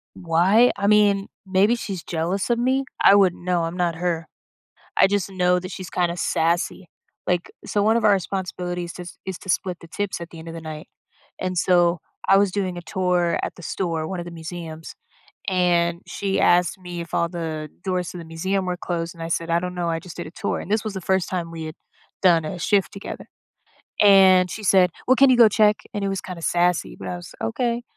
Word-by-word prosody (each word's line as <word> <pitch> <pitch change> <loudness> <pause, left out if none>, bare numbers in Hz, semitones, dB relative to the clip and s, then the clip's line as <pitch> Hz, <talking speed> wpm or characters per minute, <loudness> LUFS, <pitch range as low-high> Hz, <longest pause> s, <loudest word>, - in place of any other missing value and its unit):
Why? 185 +8 +4
I 200 - 0
mean, 205 -2 +4 0.2
maybe 195 +4 +3
she's 195 -7 -5
jealous 175 +6 -2
of 235 - +2
me. 260 +2 +1 0.2
I 200 - +8
wouldn't 185 -3 +3
know; 180 -2 +1
I'm 165 +2 -4
not 170 -2 0
her. 165 -1 -2 0.7
I - - +6
just 200 -1 -1
know 180 -1 +2
that 185 0 -8
she's 185 -1 -7
kinda 175 -1 0
sassy. 170 +2 0 0.4
Like 180 -1 0
so 205 -1 0
one 220 +2 +4
of 230 - -1
our 210 - +6
responsibilities 180 -2 -3
is 175 -1 -9
is 190 -2 -4
to 190 - -12
split 180 -1 0
the 170 - -12
tips 195 0 -3
at 170 - -7
the 165 - -11
end 160 - -11
of 165 - -6
the 165 - -7
night, 155 +1 -8 0.5
and 185 -1 -2
so 175 -1 +3 0.3
I 195 - +6
was 200 -2 +3
doing 185 -3 -2
a - - -5
tour 180 -1 0
at - - -4
the 175 - -13
store- 165 -3 -2
one 185 +1 -4
of 170 - -5
the 175 - -8
museums- 160 -1 -8 0.5
and 175 -2 +2
she 195 -1 -2
asked 175 +2 +3
me 175 -1 -7
if 170 - -10
all 170 0 +1
the 160 -3 -4
doors 180 -4 -1
to 180 - -8
the 170 - -8
museum 185 +4 -2
were 180 -1 -2
closed, 170 -1 -4
and 165 - -7
I - - -4
said, 165 0 -2
"I 170 +1 +3
don't 180 0 -5
know; 175 -1 -1
I 165 0 -1
just 175 -2 -11
did - - -5
a - - -11
tour"- - - -3
and 200 - -7
this 215 -1 +2
was 215 -2 -4
the 190 - -5
first 190 0 0
time 170 -3 -3
we 160 -1 -6
had 155 - -7 0.5
done 170 -4 +5
a 155 - -4
shift 200 +3 +1
together- 200 - -8 0.7
and 190 -3 +6
she 215 - -6
said, 185 -2 +5 0.2
"Well, 260 - +5
can 275 0 +6
you 250 - +5
go 230 -2 +8
check?" 210 0 +4 0.2
and 205 - -2
it - - 0
was 195 -1 -2
kinda 175 -3 -8
sassy, 175 - +1
but 95 - -8
I 90 - -3
was, 90 - -11
"Okay." 235 - -1
180 Hz, 225 wpm, -23 LUFS, 170-195 Hz, 0.7 s, I